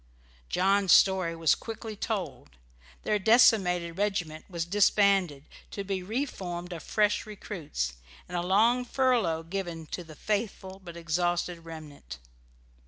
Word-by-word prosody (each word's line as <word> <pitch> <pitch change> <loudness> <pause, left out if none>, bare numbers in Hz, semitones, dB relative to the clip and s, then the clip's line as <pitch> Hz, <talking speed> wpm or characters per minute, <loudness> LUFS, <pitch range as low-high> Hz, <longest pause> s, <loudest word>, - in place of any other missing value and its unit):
John's 195 +1 +2
story 185 -3 +4
was 165 -2 +3
quickly 225 -1 -6
told. 180 - -5 0.5
Their 210 - +1
decimated 190 -6 +4
regiment 175 -7 -2
was 170 -3 -3
disbanded, 195 -5 +2 0.2
to 200 - -5
be 195 -1 -3
reformed 180 -6 -4
of 165 - -7
fresh 210 +4 +1
recruits, 160 - -5 0.3
and 180 - -7
a 175 - 0
long 220 +7 +3
furlough 240 -11 +1
given 170 -2 -5
to 180 - -4
the 160 -2 -13
faithful 195 -1 -3
but 170 -1 -9
exhausted 175 0 -1
remnant. 150 - -10
180 Hz, 125 wpm, -28 LUFS, 165-205 Hz, 0.5 s, story